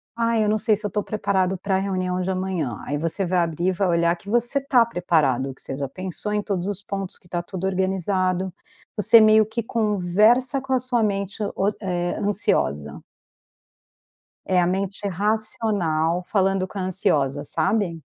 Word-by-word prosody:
ai 230 -1 +1
eu - - +1
não 215 0 +1
sei 215 -1 +3
se 210 +1 -6
eu - - 0
estou 210 0 -1
preparado 190 -3 0
pra 190 +1 0
reunião 185 -2 -1
de 185 - -2
amanhã. 185 - -2
Aí 145 - -2
você 165 +5 -1
vai 180 0 +1
abrir 170 +1 -1
e - - +4
vai 190 +1 0
olhar 170 0 +2
que 200 - -12
você 240 +4 +2
está 260 -4 +3
preparado, 145 - 0
que - - -17
você 135 - -6
já 140 -1 -3
pensou 185 +6 -5
em 210 - +1
todos 195 -3 -3
os 200 -1 -3
pontos, 195 -2 -5
que - - -30
está 175 0 -2
tudo 185 +1 -6
organizado, 185 -1 0 0.4
você 225 +2 +6
meio 215 0 +6
que 220 +1 -4
conversa 220 +5 +2
com 265 0 -3
a 255 - +3
sua 245 -2 0
mente 200 -1 -2 0.2
oci 200 +2 0
eh 175 -2 -2
ansiosa. 75 - 0 1.5
É 185 -1 +3
a 175 - +2
mente 195 +2 -2
racional 195 -4 0
falando 195 -1 +1
com 200 - -8
a - - -2
ansiosa 145 -6 0
sabe? 165 +1 0
190 Hz, 180 wpm, -23 LUFS, 175-210 Hz, 1.5 s, você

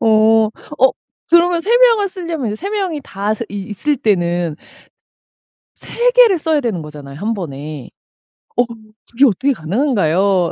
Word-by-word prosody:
어. - - 0 0.7
어 265 0 +5 0.4
그러면 340 0 +4
3 455 +7 +2
명을 460 -5 +4
쓸려면 335 - -5
이제 210 - -4
3 390 - -5
명이 380 -8 -2
다 200 -2 -3
스 230 - -5
있 200 -1 -6
있을 285 +9 -1
때는 175 - 0 1.2
3 - - -1
개를 480 -7 +5
써야 315 -1 0
되는 215 -9 -2
거잖아요, 145 -1 -10
1 225 +3 -1
번에. 150 - -7 0.7
어 245 - +4 0.5
그게 255 +4 +4
어떻게 270 +4 +1
가능한가요? 190 - +1
235 Hz, 250 characters per minute, -17 LUFS, -, 1.2 s, 어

